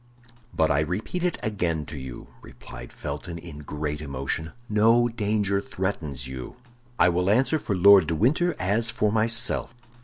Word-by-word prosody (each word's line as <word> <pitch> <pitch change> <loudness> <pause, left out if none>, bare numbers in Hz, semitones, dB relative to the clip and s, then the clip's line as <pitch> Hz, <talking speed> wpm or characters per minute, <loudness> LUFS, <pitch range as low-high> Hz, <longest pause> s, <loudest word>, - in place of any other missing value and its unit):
"But 80 0 +1
I 70 - +2
repeat 95 - -2
it 180 - 0
again 85 -8 -1
to 75 - -9
you," 65 -3 -8 0.2
replied - - -11
Felton, 85 -2 -6
in 80 -3 -10
great 75 0 -4
emotion, 70 +3 -3 0.2
"no 115 +3 +4
danger 105 -3 0
threatens 80 -11 -4
you; 65 -1 -7 0.4
I - - +5
will 90 +2 +1
answer 135 +8 +3
for 100 - -2
Lord 95 -2 +7
de 80 - 0
Winter 155 - +2
as 105 +5 0
for 105 -2 0
myself." 115 +2 +1
95 Hz, 155 wpm, -25 LUFS, 75-110 Hz, 0.4 s, Lord